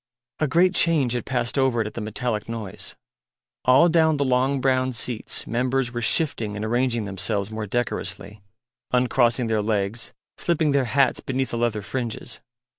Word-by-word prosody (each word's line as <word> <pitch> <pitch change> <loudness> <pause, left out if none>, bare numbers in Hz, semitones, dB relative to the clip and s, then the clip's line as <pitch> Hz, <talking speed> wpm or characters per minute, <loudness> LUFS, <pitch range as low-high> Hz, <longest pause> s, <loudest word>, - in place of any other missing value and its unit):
A 155 - +2
great 180 +6 +3
change 150 -9 +3
had 120 - -3
passed 125 0 0
over 130 -3 +2
it 110 - +1
at 105 - -6
the 115 - -5
metallic 110 +1 -3
noise. 105 -3 -3 0.7
All 130 +7 +6
down 160 -2 +3
the 140 - +1
long 130 +2 +2
brown 130 0 +1
seats 115 -1 -1
members 125 +1 0
were 120 - -3
shifting 115 -5 0
and 105 +1 -3
arranging 120 -1 0
themselves 100 +1 -1
more 110 -1 -4
decorously, 100 -2 -4 0.5
uncrossing 125 -1 +2
their 110 -1 +1
legs, 105 +1 -2 0.3
slipping 160 -3 +1
their 140 -2 +2
hats 130 +3 +2
beneath 130 0 -2
the 120 - -2
leather 110 -3 0
fringes. 120 -1 -4
120 Hz, 165 wpm, -24 LUFS, 110-135 Hz, 0.7 s, All